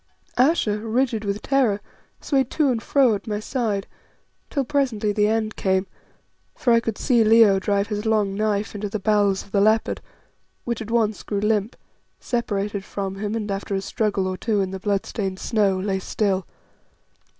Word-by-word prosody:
Ayesha, 250 -6 +2
rigid 225 0 0
with 200 0 -3
terror, 255 -7 +2 0.4
swayed 270 -3 +1
to 300 -3 +2
and 230 -2 -1
fro 265 -3 +3
at 205 +3 -5
my 210 -1 -2
side, 215 -4 -2 0.6
till 275 -3 -1
presently 250 -7 0
the 210 0 +2
end 220 0 0
came, 190 0 +1 0.7
for 240 - +2
I 230 - +6
could 225 -2 -3
see 240 -4 +3
Leo 220 -3 +6
drive 200 +1 0
his 210 -1 -2
long 210 -3 +2
knife 210 0 -1
into 205 0 -4
the 215 - -2
bowels 205 -1 +2
of 200 - -20
the 200 - +2
leopard, 215 +2 +2 0.6
which 235 -1 -3
at 220 - -6
once 220 -2 +1
grew 205 - -3
limp, 210 +1 0 0.4
separated 205 -4 -2
from 195 -1 -4
him, 205 +2 -3
and 210 -2 -3
after 195 0 -3
a 195 - -1
struggle 205 -1 -1
or 185 0 -3
two 215 0 0
in 190 -1 -1
the 190 - -5
bloodstained 195 -1 -2
snow, 200 -3 +1
lay 190 0 -1
still. 190 -1 -1
210 Hz, 175 wpm, -23 LUFS, 200-225 Hz, 0.7 s, I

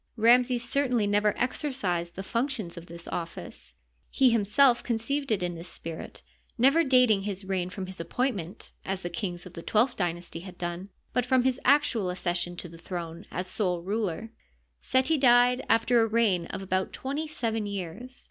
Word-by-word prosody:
Ramses 240 +1 +4
certainly 250 -5 +1
never 205 +1 +2
exercised 200 - -1
the 195 - -5
functions 230 -5 -2
of 170 0 -10
this 170 0 -9
office. 165 - -6 0.3
He 260 -2 +4
himself 235 +4 +4
conceived 260 +4 -1
it 195 -4 +1
in 175 0 -1
this 170 +1 -8
spirit, 165 -2 -7 0.3
never 275 +7 +5
datine 250 -7 +4
his 195 -1 -4
reign 185 -2 -1
from 185 +1 -5
his 185 -1 -9
appointment, 195 -1 -3
as 190 0 -3
the 175 - -4
kings 175 0 -4
of 180 - -11
the 170 - -7
twelfth 230 +8 +2
dynasty 175 -2 -3
had 180 0 -10
done, 175 +2 -4 0.2
but 250 - +2
from 255 +1 +3
his 260 0 +1
actual 250 -8 +3
accession 175 -1 -2
to 175 - -5
the 165 0 -13
throne 170 +1 -6
as 180 - -3
sole 180 -3 -1
ruler. 210 +1 -2 0.5
Seti 265 +4 +2
died 245 -1 +5
after 230 +1 +4
a 225 - +3
reign 215 -6 +2
of 195 - -5
about 185 0 -1
twenty 285 +4 -3
seven 225 -7 -2
years. 200 +6 -6
205 Hz, 175 wpm, -28 LUFS, 175-245 Hz, 0.5 s, never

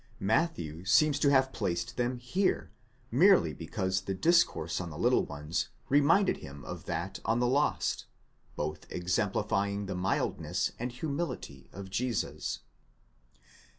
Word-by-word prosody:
Matthew 100 - 0
seems 145 +9 +4
to 145 - +4
have 135 -1 +3
placed 100 +3 -2
them 125 +1 0
here, 175 +11 0 0.4
merely - - +5
because 95 0 -2
the 95 +1 -3
discourse 125 - +2
on 85 - -5
the 75 - -8
little - - +3
ones 75 +3 -3 0.2
reminded 145 +8 +4
him 70 +1 -10
of - - -7
that - - -3
on 115 +2 +1
the 125 - +2
lost—both 120 - -2
exemplifying 100 +2 0
the 95 - -4
mildness 90 +1 -1
and 120 +2 -3
humility 140 - -4
of 95 -1 -9
Jesus. 120 +1 -2
105 Hz, 125 wpm, -30 LUFS, 90-140 Hz, 0.4 s, merely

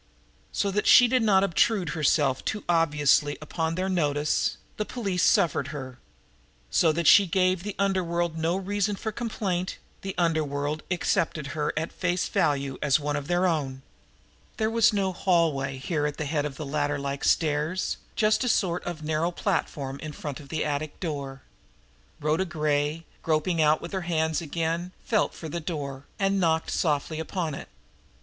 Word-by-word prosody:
So 200 - 0
that 210 +2 0
she 245 - +8
did 255 +1 +2
not 200 -3 +4
obtrude 195 0 +2
herself 145 -4 +1
too 210 -2 -3
obviously 150 -3 +3
upon 160 +1 -2
their 185 +2 -1
notice, 150 -5 +1 0.2
the 215 - 0
police 200 -6 -2
suffered 175 -8 +3
her; 130 -4 -7 0.7
so 165 - +4
that 170 +2 -2
she 200 +4 +7
gave 185 0 +2
the 205 +1 -5
underworld 175 -4 0
no 165 +3 0
reason 205 +1 -1
for 220 +2 -4
complaint, 205 -6 -2 0.2
the 195 0 -5
underworld 155 -3 0
accepted 165 -4 0
her 150 -1 -1
at 160 +2 -2
face 180 0 -1
value 140 -3 0
as 140 -1 +3
one 145 0 -2
of 145 -1 -3
its 175 0 +2
own! 145 -7 0 0.7
There 220 -1 0
was 230 0 +4
no 195 -3 0
hallway 160 -8 +1
here 150 +2 -1
at 150 - -5
the 150 - -3
head 150 0 -1
of 140 -2 -5
the 155 - -5
ladder 145 0 -1
like 140 0 -4
stairs, 155 +3 +1 0.2
just 215 +3 +2
a 250 - +1
sort 180 -5 +1
of 170 -3 -5
narrow 155 +2 0
platform 150 -7 -2
in 155 -1 -6
front 145 -1 -6
of 140 -2 -13
the 160 - -1
attic 150 0 -3
door. 140 -5 -5 0.8
Rhoda 155 +5 +1
Gray, 155 -1 -1 0.2
groping 160 +1 +1
out 155 0 +4
with - - -6
her 190 -2 -2
hands 160 -2 0
again, 165 +3 -2
felt 215 -3 +1
for 160 - -7
the 170 +3 -3
door, 140 -5 -5
and 195 -1 +1
knocked 160 -2 +1
softly 155 0 0
upon 160 -1 -3
it. - - -8
160 Hz, 170 wpm, -26 LUFS, 145-185 Hz, 0.8 s, she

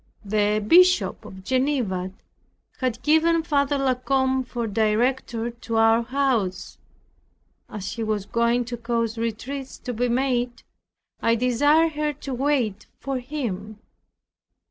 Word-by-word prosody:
The 210 +1 +1
Bishop 365 +5 +4
of 190 0 -11
Geneva 255 -8 0 0.7
had 250 -2 -2
given 325 +2 +3
Father 285 -3 +1
La 270 -1 +2
Combe 265 +1 0
for 240 -2 -4
director 225 +2 0
to 230 -1 -6
our 225 +1 +5
house. 240 -6 -1 0.9
As 200 -2 -5
he 225 0 -4
was 215 -2 -2
going 235 +3 +1
to 240 0 -5
cause 230 -1 -2
retreats 255 +4 -4
to 250 - -6
be 245 +2 0
made, 245 -1 0 0.6
I 230 0 +3
desired 290 +7 +3
her 300 0 -1
to 275 -1 -7
wait 250 -6 0
for 270 -2 -3
him. 220 -7 -5
245 Hz, 125 wpm, -24 LUFS, 225-275 Hz, 0.9 s, our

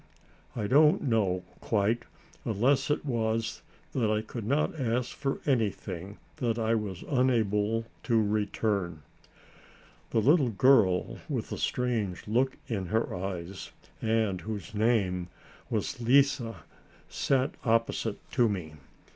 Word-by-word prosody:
I 110 - -2
don't 150 +8 +5
know, 100 -8 +1 0.2
quite, 110 +2 0 0.4
unless 125 +6 +2
it 150 +1 0
was 115 -3 -1 0.3
that 115 -5 +1
I 110 0 +1
could 110 -1 -6
not 150 +4 +1
ask 125 0 -1
for 135 -1 -2
anything 105 - -1 0.2
that 115 -2 0
I 115 0 +1
was 105 -5 -2
unable 115 -4 +1 0.2
to 115 -3 +3
return. 105 -5 -1 1.1
The - - -1
little 140 +3 +4
girl 110 -5 +3
with - - -3
the - - -3
strange 115 -8 -1
look 125 +5 +1
in 100 -6 -2
her 110 +5 0
eyes, 95 0 -5 0.3
and 110 -5 +1
whose 105 -4 -6
name 105 -5 +1 0.4
was - - -2
Lise, 135 +3 +4 0.7
sat 135 0 +1
opposite 115 -2 +1
to 120 -3 +3
me. 90 -7 -4
110 Hz, 120 wpm, -29 LUFS, 100-125 Hz, 1.1 s, don't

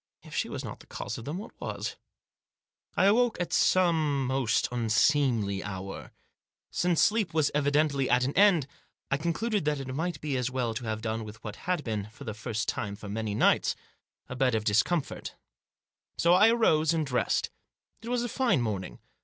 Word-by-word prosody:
If - - -13
she - - 0
was - - -5
not - - -7
the - - -17
cause 105 - -5
of 115 - -9
them, 150 +5 -4
what 210 +4 -8
was? - - -4 1.0
I 185 - +4
awoke 230 +3 +3
at 175 -1 -2
some 160 -7 +3
most 130 -3 +1
unseemly 115 -3 +2
hour. 95 -1 -6 0.6
Since 175 -2 +2
sleep 210 -7 +1
was 155 -2 +3
evidently 145 -1 +2
at 125 +1 +3
an 135 +3 -1
end 190 -7 +5 0.5
I 135 - +3
concluded 195 +7 -1
that 150 -1 0
it 130 -1 -5
might 170 +5 -2
be 145 -3 -2
as 125 0 -1
well 125 -3 -1
to 115 +2 -5
have 110 0 -3
done 110 0 -2
with 110 +1 -11
what 105 - -6
had 180 -5 +1
been, 105 -3 -3
for 110 +6 -12
the 110 -5 -4
first 110 0 -3
time 100 -3 -2
for 100 0 -9
many 105 0 -3
nights, - - +3 0.5
a 125 - -6
bed 125 -2 +2
of 110 - 0
discomfort. 115 - 0 0.8
So 170 +1 +4
I 205 +5 +7
arose 165 -9 +3
and 160 -2 0
dressed. 125 -3 0 0.5
It 230 - -7
was 245 -1 0
a - - -1
fine 240 - +1
morning. 95 - -3
135 Hz, 185 wpm, -28 LUFS, 110-170 Hz, 1.0 s, I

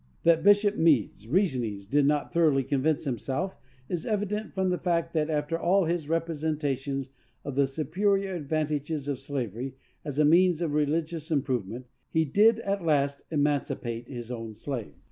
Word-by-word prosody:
That 165 -1 +5
Bishop 205 +1 +5
Meades, 125 - +2
reasonings 125 - 0
did 140 +6 +2
not 150 0 0
thoroughly 155 -5 +3
convince 145 +3 0
himself 135 +7 -2 0.3
is 175 -3 -3
evident 210 0 -2
from 190 -1 0
the 180 - -1
fact 170 -2 0
that, 155 -1 0
after 155 +2 -1
all 185 +2 +3
his 165 -2 -2
representations 150 -5 -1 0.4
of 140 -2 -4
the 140 0 +3
superior 195 +7 0
advantages 150 -2 -2
of 140 -3 -2
slavery 130 -2 -4 0.3
as 145 -2 -5
a 150 - +4
means 175 +2 +5
of 165 -4 -1
religious 155 +2 -1
improvement, 130 - -1 0.2
he 160 0 +2
did, 215 +9 +4
at 200 -3 -2
last, 140 -3 +1
emancipate 140 -6 -1
his 120 -3 -7
own 115 -3 -6
slaves. 115 - -5
150 Hz, 155 wpm, -28 LUFS, 135-170 Hz, 0.4 s, That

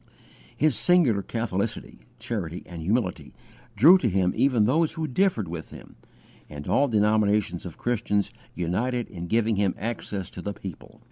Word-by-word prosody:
His 150 -4 +2
singular 140 - +3
catholicity, 110 0 -3 0.2
charity, 105 -7 -4
and 85 -2 -8
humility 95 +2 -1 0.4
drew 160 - +7
to 120 - +1
him 95 -1 +1
even 125 -6 +3
those 155 +7 +2
who 160 -2 -3
differed 130 - +1
with 80 -1 -6
him, - - -13 0.5
and 75 -1 -8
all 145 - +3
denominations 105 -5 +1
of 85 - -10
Christians 105 -4 -1 0.2
united 115 +8 -1
in 85 -3 -7
giving 110 +1 +1
him 100 -2 +1
access 105 -3 -4
to 90 - -8
the 100 +3 -4
people. 95 -5 -10
105 Hz, 150 wpm, -26 LUFS, 95-120 Hz, 0.5 s, drew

